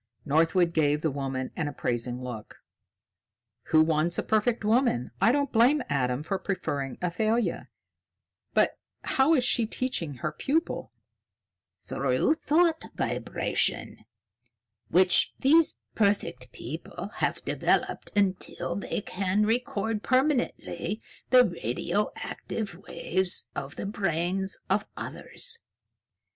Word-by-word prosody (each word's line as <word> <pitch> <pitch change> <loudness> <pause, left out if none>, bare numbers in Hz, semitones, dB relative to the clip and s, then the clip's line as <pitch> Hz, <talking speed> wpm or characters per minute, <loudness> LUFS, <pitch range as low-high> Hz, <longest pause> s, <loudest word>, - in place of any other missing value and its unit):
Northwood 165 +4 +3
gave 150 -2 +2
the 160 - 0
woman 135 -2 -3
an 155 -4 -1
appraising 125 -2 -2
look. 120 -4 -8 1.0
"Who 155 0 +5
wants 160 +2 +2
a - - 0
perfect 220 +1 +1
woman? 220 - +2
I 225 - +6
don't 280 0 0
blame 250 +5 +4
Adam 130 -1 0
for 190 +4 -2
preferring 145 -9 -3
Athalia. 220 +6 0 0.9
But - - +3 0.2
how 275 +5 +3
is 255 - +2
she 235 -2 +2
teaching 195 - -1
her 150 +5 -3
pupil?" 305 - -1 0.9
"Through - - +1
thought 320 +1 +2
vibration, - - -1 0.9
which 185 0 +4
these 315 +4 +4 0.2
perfect 200 - 0
people 160 - -7
have - - -1
developed - - 0
until 195 -2 0
they 200 - -3
can 195 +2 0
record 225 -2 -1
permanently 255 - 0 0.3
the 250 0 +7
radioactive 195 - -3 0.2
waves 185 +1 +1
of 140 0 -6
the - - -5
brains 190 -1 -1
of - - +1
others." 465 -1 -7
190 Hz, 110 wpm, -28 LUFS, 150-240 Hz, 1.0 s, the